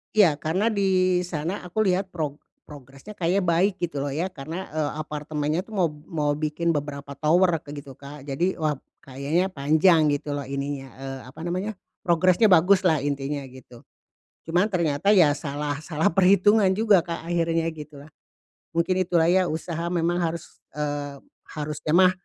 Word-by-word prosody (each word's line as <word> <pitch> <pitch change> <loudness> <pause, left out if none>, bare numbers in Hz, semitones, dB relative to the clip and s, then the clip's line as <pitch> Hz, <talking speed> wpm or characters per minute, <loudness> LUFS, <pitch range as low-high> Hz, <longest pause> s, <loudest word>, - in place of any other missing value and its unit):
Iya, 185 -9 +5
karena 175 +9 -1
di 185 -4 +2
sana 175 +3 -4
aku 195 +4 -1
lihat 190 +1 0
prog 150 -4 -3 0.3
progresnya 140 +7 -12
kayaknya 180 +2 +1
baik, 180 +4 +2
gitu 165 -6 -2
loh, 140 - -3
ya. 165 +6 -1
Karena, 170 +2 -7
eee, 155 -1 -2
apartemennya 150 +2 -3
tuh 220 - -18
mau 185 -5 +2 0.2
mau 150 -2 -1
bikin 155 +2 -1
beberapa 140 -1 -5
tower 170 +4 +3
kayak 145 - -9
gitu, 135 -2 -12
Kak. 140 +1 -11
Jadi, 170 +7 -1
wah, 155 -2 0 0.3
kayaknya 140 +8 -1
panjang 155 0 +3
gitu 145 0 -2
loh, 145 - -3
ininya, 140 0 -5
eee 135 0 -6
apa - - -15
namanya, 185 +5 -2 0.3
progresnya 185 +4 +3
baguslah, 180 -2 +5
intinya 140 0 -3
gitu. 125 -2 -15 0.6
Cuman 175 +4 +2
ternyata 170 +3 +2
ya 170 -7 +6
salah 145 0 -3
salah 160 -1 +1
perhitungan 195 +3 +4
juga, 200 -4 +3
Kak, 170 0 -6
akhirnya 165 -1 +1
gitulah. 150 -2 -11 0.6
Mungkin 175 +2 +1
itulah 170 -2 +2
ya, 185 0 +3
usaha 165 +1 -3
memang 175 0 0
harus, 165 -1 -4 0.2
eee, 145 -1 -3 0.4
harusnya 150 0 -3
mah, 185 +1 +6
165 Hz, 155 wpm, -25 LUFS, 145-180 Hz, 0.6 s, ya